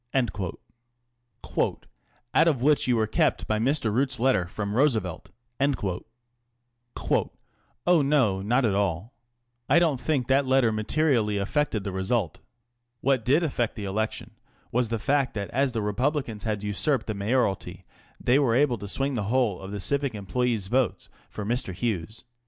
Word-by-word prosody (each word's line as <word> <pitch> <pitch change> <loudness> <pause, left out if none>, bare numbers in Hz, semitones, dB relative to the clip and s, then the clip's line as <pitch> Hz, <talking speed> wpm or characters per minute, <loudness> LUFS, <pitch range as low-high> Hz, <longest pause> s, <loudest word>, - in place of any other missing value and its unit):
" - - -46
Out 120 +2 -4 0.6
of 135 -7 +1
which 150 -1 +3
you 125 - +3
were 110 -1 +2
kept 110 - +1
by 110 0 0
Mr. 125 -2 +1
Root's 125 +1 0
letter 120 -8 +2
from 100 +2 -4
Roosevelt? 110 - 0 0.2
" 120 0 -48
┬ŻC 125 -10 -1 1.8
Oh, 175 -3 +5
no; 135 -9 +2
not 120 +6 +2
at 105 - +2
all. 100 +3 -1 0.6
I 145 - +5
don't 160 -7 +2
think 145 -6 0
that 135 0 +3
letter 130 -3 +3
materially 110 -1 +1
affected 110 +1 -1
the 100 - -3
result. 95 -1 -1 0.6
What 130 -3 +2
did 140 +8 +3
affect 125 -7 -1
the 105 - -5
election 110 +3 -3 0.4
was 120 -1 +1
the 115 - -1
fact 135 +4 0
that 100 -2 -4
as 135 0 +1
the 110 -3 -1
Republicans 115 0 -1
had 105 -2 -2
usurped 110 +5 0
the 110 - -3
mayoralty, 100 0 -1 0.3
they 125 +3 +3
were 125 -5 +2
able 130 -4 +2
to 100 - -7
swing 135 +7 -1
the 110 -5 -2
whole 120 -7 +1
of 95 - -8
the 100 0 -5
civic 140 +3 0
employes' 105 +2 -1
votes 105 -3 0 0.2
for 105 - -6
Mr. 115 -5 -1
Hughes. 110 -1 -3
120 Hz, 160 wpm, -26 LUFS, 105-135 Hz, 1.8 s, Oh